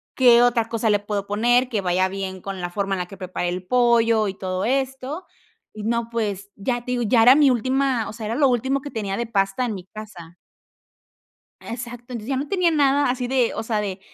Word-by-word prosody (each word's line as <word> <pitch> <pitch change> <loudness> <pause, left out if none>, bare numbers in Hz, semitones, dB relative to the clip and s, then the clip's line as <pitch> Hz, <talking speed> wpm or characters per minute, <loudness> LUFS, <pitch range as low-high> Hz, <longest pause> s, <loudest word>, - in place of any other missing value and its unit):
¿qué 240 -2 +6
otra 235 -2 +2
cosa 225 -1 0
le 205 - +3
puedo 205 -1 -3
poner, 240 +5 +2
que 220 -5 -2
vaya 185 +1 +1
bien 190 -1 -5
con 195 -1 -6
la 175 - -3
forma 195 +2 -2
en 190 - -1
la 180 - -3
que 195 - -12
preparé 185 -1 -3
el 180 +1 -4
pollo 230 -2 +3
y 190 - -4
todo 185 0 -3
esto?". 265 +6 -2 0.5
Y 215 - -8
no, 235 +1 -1
pues, 205 -3 -3
ya 240 +4 -3
te 250 - -4
digo, 245 -1 0
ya 230 0 +4
era 245 +3 +9
mi 290 0 +5
última 255 -1 +1
o - - -7
sea, 215 -1 -6
era 225 - -2
lo 280 +1 +4
último 265 +2 +1
que 290 0 -8
tenía 200 -3 -3
de 235 - -2
pasta 200 +2 0
en 230 - -2
mi 185 -3 -8
casa. 185 -5 -11 1.3
Exacto. 240 0 -7
Entonces, 230 -1 -6
ya 270 - 0
no 280 +3 -3
tenía 365 -3 +2
nada 285 -2 +3
así 250 0 -2
de, 255 -2 +1
o 225 - -3
sea, 220 -2 -1
de 195 -2 -4
230 Hz, 230 wpm, -22 LUFS, 200-250 Hz, 1.3 s, era